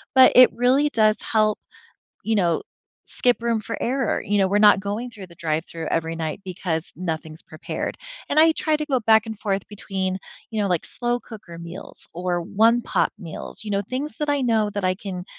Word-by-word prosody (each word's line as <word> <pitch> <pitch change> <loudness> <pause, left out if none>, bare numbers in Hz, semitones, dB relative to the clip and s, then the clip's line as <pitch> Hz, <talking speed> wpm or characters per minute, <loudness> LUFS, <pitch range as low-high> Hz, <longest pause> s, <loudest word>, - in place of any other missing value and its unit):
But 260 -1 +8
it 255 0 +8
really 250 +6 +3
does 215 -4 +2
help, 215 -1 +1 0.6
you 225 0 0
know, 175 -4 +2 0.4
skip 245 -2 +1
room 230 -2 +1
for 225 +2 -5
error. 260 -1 0
You 205 +1 0
know, 195 - +4
we're 200 +2 +2
not 205 -2 +6
going 210 +5 -4
through 205 -5 -10
the 170 - -16
drive-through 165 0 -3
every 165 0 -1
night 160 +2 -4
because 175 -3 -3
nothing's 160 -2 -5
prepared. - - -5 0.3
And 295 - +1
I 325 +1 +6
try 315 -1 0
to 305 0 -4
go 265 -4 +1
back 220 0 +4
and 220 -2 -6
forth 200 -3 -2
between, 190 -2 -3 0.3
you 220 -2 -2
know, 200 - 0
like, 175 -3 0
slow-cooker 235 -7 -4
meals 170 +3 -9
or 175 0 -1
one-pot 225 +7 +2
meals, 170 +4 -8
you 210 - -5
know, 200 0 +1
things 260 +8 -5
that 300 - -2
I 285 -1 +1
know 225 -4 +2
that 205 -1 -3
I 185 0 +2
can 185 -2 -6
205 Hz, 195 wpm, -23 LUFS, 180-235 Hz, 0.6 s, But